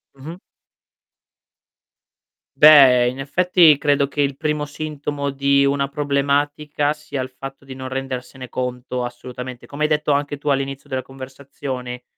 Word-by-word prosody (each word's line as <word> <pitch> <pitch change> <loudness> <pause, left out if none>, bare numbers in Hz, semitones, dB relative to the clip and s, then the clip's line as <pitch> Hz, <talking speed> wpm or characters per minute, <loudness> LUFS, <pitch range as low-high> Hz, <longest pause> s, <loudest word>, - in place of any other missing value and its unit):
Mh-mh. 160 +7 -10 2.2
Beh, 135 -5 +8
in 130 +2 -4
effetti, 165 +2 +4
credo 145 -1 +1
che 145 - -8
il 140 -1 0
primo 150 -1 -2
sintomo 145 -1 -4
di 140 0 +2
una 140 0 +1
problematica, 145 +1 0
sia 150 -3 -5
il 130 - -5
fatto 135 +1 -10
di 135 -1 -10
non 130 0 -7
rendersene 130 -1 -6
conto 125 0 -4
assolutamente. 125 0 -8
Come 145 +2 -5
hai 150 - +2
detto 150 -1 +1
anche 145 0 0
tu 145 +1 -4
all'inizio 135 +1 -2
della 130 -1 -2
conversazione, 130 -2 -8
140 Hz, 140 wpm, -21 LUFS, 130-145 Hz, 2.2 s, Beh